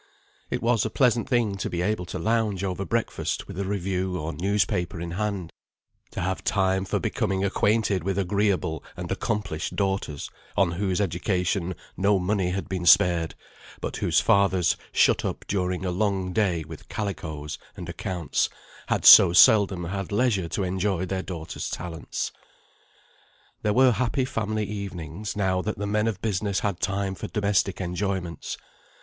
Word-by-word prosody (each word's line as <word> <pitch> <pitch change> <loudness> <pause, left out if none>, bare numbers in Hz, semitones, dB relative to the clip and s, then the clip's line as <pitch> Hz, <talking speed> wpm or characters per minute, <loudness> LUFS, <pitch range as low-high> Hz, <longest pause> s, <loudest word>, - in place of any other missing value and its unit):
It - - -3
was 115 -3 +3
a 110 - -1
pleasant 120 0 +2
thing 115 -6 +1
to - - -3
be 85 0 -2
able 95 -2 -1
to - - -5
lounge 110 -4 0
over 95 0 -2
breakfast 115 +2 -2
with 90 - -7
a 100 - -1
review 95 -1 -1
or 80 +1 -4
newspaper 90 0 0
in 85 0 -5
hand; 100 -2 -3 0.6
to - - -5
have 95 +1 -2
time 95 -1 +1
for - - -1
becoming 95 0 -1
acquainted 105 -2 +1
with 95 +1 -1
agreeable 95 -4 0
and - - -5
accomplished 90 -7 -2
daughters, 95 -7 -2 0.3
on 95 -4 +3
whose 95 +2 -1
education 90 -1 0 0.2
no 100 +1 +3
money 95 0 0
had 95 +2 -3
been 90 -2 -3
spared, 85 -1 +5 0.4
but - - -4
whose - - +2
fathers, 95 -3 +3 0.2
shut - - +3
up - - -4
during 90 -1 -1
a 90 - 0
long 95 -1 0
day 90 -6 +1
with - - -11
calicoes 80 -8 -4 0.2
and - - -7
accounts, 90 -4 -1 0.4
had - - 0
so 85 - +10
seldom 95 -1 +6
had 95 +3 -4
leisure 100 -6 +1
to 100 - -1
enjoy 95 0 0
their 95 0 -2
daughters' 85 -4 -5
talents. 85 -2 -4 1.3
There 105 - +1
were 130 +3 +5
happy 125 +3 0
family 110 -4 -2
evenings, 100 -1 -5
now 95 -2 +1
that 105 +3 -3
the 100 - -3
men 105 +2 +1
of 100 -4 -3
business 100 -2 0
had 100 -4 -1
time 100 -1 -1
for - - -6
domestic 100 -2 0
enjoyments. 90 -2 -3
95 Hz, 160 wpm, -26 LUFS, 90-105 Hz, 1.3 s, so